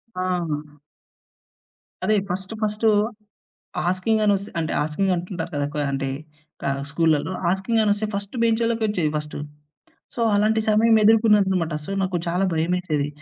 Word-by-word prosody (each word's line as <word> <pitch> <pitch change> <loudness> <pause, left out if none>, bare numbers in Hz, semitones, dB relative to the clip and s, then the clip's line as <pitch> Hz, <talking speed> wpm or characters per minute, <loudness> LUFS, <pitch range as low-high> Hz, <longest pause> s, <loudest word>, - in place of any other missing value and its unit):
ఆ! 185 - -2 1.8
అదే 215 - +3
first, 190 +4 -4
first 215 +1 0 1.0
asking 185 +5 +1
అని 205 - +4
ఒస్తే 200 +1 -7
అంటే, 160 -1 -1
ఆస్కింగ్ 170 +6 0
అంటుంటారు 175 -1 -4
కదా! 145 0 0
ఎక్కువ 150 0 -3
అంటే 135 0 -2 0.6
ఆహ్, 140 0 -1
స్కూల్లల్లో. 160 +2 +1 0.2
ఆస్కింగ్ 195 +5 +1
అని 210 - +2
ఒస్తే 215 +1 -2
ఫస్ట్ 200 +3 -4
బెం‌చోళ్ళకొచ్చేది 225 -7 +1
ఫస్ట్. 150 0 -5 0.8
సో, 235 - -4
అలాంటి 215 +2 +3
సమయం 220 +1 +5
ఎదురుకున్నాననమాట. 205 -6 +4
సో - - -7
నాకు 185 -1 -1
చాలా 175 +3 +1
భయమేసేది. 160 -3 0
190 Hz, 130 wpm, -23 LUFS, 165-215 Hz, 1.8 s, సమయం